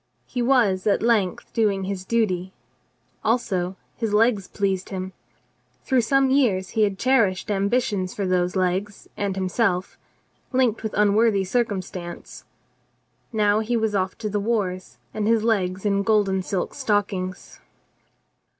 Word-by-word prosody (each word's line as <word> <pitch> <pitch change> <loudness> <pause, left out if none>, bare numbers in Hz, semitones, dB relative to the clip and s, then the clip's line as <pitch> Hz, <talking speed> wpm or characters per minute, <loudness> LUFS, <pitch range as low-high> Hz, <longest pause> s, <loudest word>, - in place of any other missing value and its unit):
He 245 - -3
was 230 -7 +2
at 205 - +2
length 215 -6 0
doing 205 -4 +1
his 190 -1 -4
duty. 190 -5 0 0.7
Also 190 -6 0 0.2
his 220 -3 -1
legs 215 -3 +3
pleased 195 -2 -2
him. 190 -1 -5 0.7
Through 260 -2 +2
some 270 +3 +2
years 210 -9 +2
he 220 - -1
had 200 -2 +2
cherished 215 -6 +2
ambitions 200 -1 0
for 200 - -2
those 180 0 0
legs 190 +2 -1
and 200 -2 -2
himself, 190 0 -1 0.5
linked 255 -4 +2
with 220 -1 -4
unworthy 210 0 +3
cir 240 +6 +1
cumstance. 185 -4 -7 0.9
Now 210 -2 +2
he 230 +2 0
was 220 -1 0
off 190 -2 -1
to 215 - -4
the 205 - 0
wars 200 -4 -2 0.2
and 215 -1 -1
his 225 -1 +3
legs 195 -4 0
in 200 -1 +2
golden 200 -3 +2
silk 185 -1 -3
stockings. 205 -7 -2
205 Hz, 140 wpm, -23 LUFS, 185-225 Hz, 0.9 s, legs